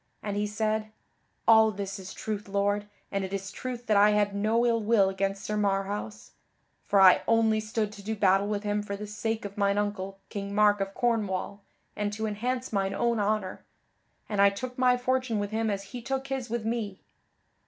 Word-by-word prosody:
And 205 -1 -3
he 205 0 0
said: 215 +1 -1 0.6
"All 220 -1 +7
this 200 -1 -5
is 190 0 -8
truth, 210 -2 -5
Lord, 205 +1 0 0.2
and 195 -1 -1
it 190 - -5
is 195 0 -4
truth 245 +1 -6
that 215 -2 +3
I 205 +1 +7
had 205 -1 +2
no 220 +4 +2
ill 230 -1 +2
will 210 -3 +3
against 195 +1 -2
Sir 210 - -2
Marhaus; 205 +1 -2 0.6
for 200 - +3
I 190 -1 +7
only 225 -1 +3
stood 215 -1 -2
to 205 -1 -11
do 220 +2 -2
battle 195 -1 +3
with 210 0 -2
him 205 0 0
for 200 -1 -5
the 210 +1 -6
sake 220 +1 -3
of 200 +1 -7
mine 200 0 +2
uncle, 195 -2 -2
King 200 0 -5
Mark 205 -1 +4
of 195 0 -3
Cornwall, 205 -4 -1 0.3
and 210 0 -1
to 220 +1 -3
enhance 245 +4 -2
mine 195 -1 0
own 235 0 +1
honor; 205 -2 -1 0.6
and 205 -2 0
I 200 - +7
took 250 +6 -6
my 250 -1 +3
fortune 255 -2 0
with 205 0 -2
him 220 0 0
as 200 -1 -2
he 245 - -5
took 270 +2 -3
his 265 -3 -3
with 230 -1 -2
me. 220 -4 -3
210 Hz, 200 wpm, -28 LUFS, 200-225 Hz, 0.6 s, All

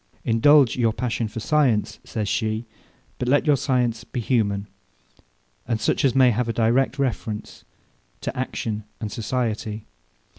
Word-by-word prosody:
Indulge 130 +3 +5
your 115 -3 +2
passion 120 -1 -2
for 110 - -6
science, 130 -5 +1
says 105 -2 -3
she, 110 +2 -1 0.5
but 125 - -2
let 145 +5 +3
your 150 -2 +5
science 125 -4 0
be - - -5
human, 105 -4 0 1.0
and 115 -2 0
such 110 - 0
as 135 -2 +3
may 130 -2 +6
have 120 +1 -1
a - - 0
direct 120 +4 +2
reference 115 -5 -3 0.6
to - - -4
action 110 -4 -3 0.2
and 105 -2 -4
society. 110 -3 -3
115 Hz, 145 wpm, -23 LUFS, 110-130 Hz, 1.0 s, may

